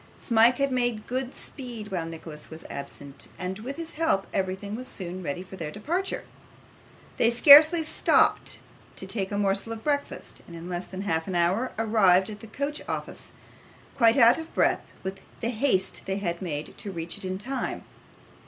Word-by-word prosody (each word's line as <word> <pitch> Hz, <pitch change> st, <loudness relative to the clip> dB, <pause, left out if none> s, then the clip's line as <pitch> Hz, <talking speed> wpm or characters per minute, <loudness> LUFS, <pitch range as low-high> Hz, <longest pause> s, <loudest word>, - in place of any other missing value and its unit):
Smike 235 Hz, +1 st, +4 dB
had 275 Hz, -1 st, +1 dB
made 240 Hz, -4 st, 0 dB
good 255 Hz, +1 st, -3 dB
speed 235 Hz, -6 st, -8 dB
while 170 Hz, -3 st, -2 dB
Nicholas 160 Hz, -2 st, -9 dB
was 160 Hz, 0 st, -7 dB
absent, 140 Hz, 0 st, -7 dB
and 185 Hz, +2 st, -4 dB
with 260 Hz, +6 st, -5 dB
his 330 Hz, 0 st, -5 dB
help 305 Hz, -12 st, +1 dB
everything 190 Hz, +2 st, -2 dB
was 255 Hz, +2 st, -6 dB
soon 185 Hz, -5 st, -6 dB
ready 175 Hz, +2 st, -4 dB
for 190 Hz, 0 st, -11 dB
their 160 Hz, -4 st, -4 dB
departure. 335 Hz, -, -2 dB, 0.9 s
They 230 Hz, -, +4 dB
scarcely 300 Hz, +7 st, +8 dB
stopped 310 Hz, -, +2 dB, 0.4 s
to -, -, -6 dB
take 195 Hz, -3 st, -2 dB
a 200 Hz, -, -1 dB
morsel 200 Hz, +2 st, 0 dB
of 220 Hz, -, -9 dB
breakfast, 285 Hz, -1 st, -2 dB
and 170 Hz, -, -10 dB
in 165 Hz, +1 st, -8 dB
less 175 Hz, 0 st, -3 dB
than 190 Hz, 0 st, -7 dB
half 160 Hz, -5 st, -1 dB
an 190 Hz, -, -3 dB
hour 185 Hz, +9 st, +1 dB
arrived 210 Hz, -4 st, +4 dB
at 210 Hz, -, -8 dB
the 225 Hz, -, -10 dB
coach 280 Hz, +7 st, -3 dB
office: -, -, -5 dB, 0.6 s
quite 230 Hz, -2 st, +5 dB
out 235 Hz, +2 st, +7 dB
of 320 Hz, 0 st, -8 dB
breath -, -, +3 dB, 0.2 s
with 190 Hz, 0 st, -4 dB, 0.2 s
the 230 Hz, -, -1 dB
haste 215 Hz, -6 st, 0 dB
they 190 Hz, 0 st, -1 dB
had 170 Hz, -3 st, -3 dB
made 155 Hz, -5 st, -4 dB
to 200 Hz, -, -6 dB
reach 165 Hz, -2 st, -4 dB
it -, -, -5 dB
in 185 Hz, 0 st, -2 dB
time. 260 Hz, +6 st, -4 dB
205 Hz, 180 wpm, -27 LUFS, 185-250 Hz, 0.9 s, scarcely